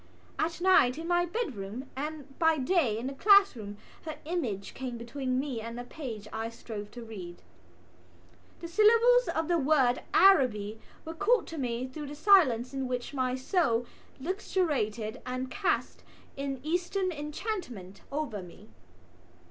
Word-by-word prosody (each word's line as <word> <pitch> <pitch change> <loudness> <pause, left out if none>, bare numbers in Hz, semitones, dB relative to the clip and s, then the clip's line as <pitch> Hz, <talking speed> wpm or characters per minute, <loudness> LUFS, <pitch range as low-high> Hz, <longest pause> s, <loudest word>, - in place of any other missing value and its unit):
At 330 +1 -1
night 325 -9 +5
in 330 +1 -5
my 350 0 +2
bedroom 260 - -4
and 295 +1 -4
by 320 -1 +4
day 265 - +2
in 230 - -4
the 270 - -3
classroom 275 - +4 0.3
her 315 - -5
image 245 - -3
came 250 -2 -5
between 255 +2 -2
me 265 -5 -3
and 230 +1 -6
the 245 - -5
page 240 -6 -7
I 225 +1 -3
strove 220 -3 -8
to 240 - -8
read. 185 -6 -9 1.2
The 340 - -5
syllables 460 +7 +5
of 320 -1 0
the 345 -1 +2
word 265 -4 +3
Araby 225 - +4 0.3
were 325 - -5
called 425 +8 +2
to 325 - -6
me 245 -1 -2
through 290 +3 -7
the 290 - -7
silence 285 - +4
in 270 -1 -2
which 250 +2 -4
my 255 -2 0
soul 260 -4 +1 0.3
luxuriated 265 - -1
and 255 0 -4
cast 410 -2 -1 0.3
an 275 -1 -3
Eastern 360 +4 -1
enchantment 295 - -5
over 280 -9 -3
me. 175 -8 -13
270 Hz, 150 wpm, -29 LUFS, 235-340 Hz, 1.2 s, night